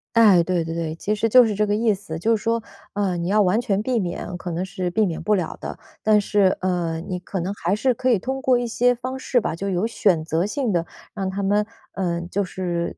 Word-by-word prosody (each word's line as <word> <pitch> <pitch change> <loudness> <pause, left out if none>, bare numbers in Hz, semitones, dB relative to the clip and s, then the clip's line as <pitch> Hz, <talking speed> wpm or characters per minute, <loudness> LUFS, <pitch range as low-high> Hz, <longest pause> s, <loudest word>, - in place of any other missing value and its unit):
哎， 210 -6 +7
对 175 -1 0
对 165 0 -5
对， 165 -1 -3
其 205 +5 -2
实 220 +2 0
就 250 +2 +8
是 220 - 0
这 210 +1 +1
个 205 - +1
意 220 0 +2
思。 190 -5 -6
就 225 +6 +2
是 210 - -4
说， 230 0 0 0.3
呃， 200 -3 0
你 170 - -2
要 210 +3 +3
完 200 +6 +2
全 200 -3 0
避 245 -1 +1
免， 180 -1 -4
可 175 - -6
能 170 +3 -2
是 185 -1 -3
避 210 +4 +2
免 165 -3 -3
不 210 0 +2
了 180 -4 -2
的。 - - -6 0.2
但 215 -1 +4
是， 200 -2 +2
呃， 175 -3 -1
你 180 +1 -4
可 190 +1 -5
能 185 +3 -2
还 190 -1 -1
是 250 +4 +2
可 255 +3 -1
以 235 - +4
通 265 +6 -4
过 255 -2 +3
一 245 - -1
些 245 +1 +2
方 255 +2 -5
式 255 -1 +1
吧， 165 - -2
就 195 +3 -3
有 185 +3 0
选 185 -8 +1
择 165 +2 0
性 235 -2 -1
地 170 -1 0 0.3
让 195 -2 -2
他 195 +1 -3
们， 205 +2 +2 0.3
呃， 170 -3 -1
就 190 +4 -2
是， 175 -2 -3
195 Hz, 275 characters per minute, -23 LUFS, 175-220 Hz, 0.3 s, 就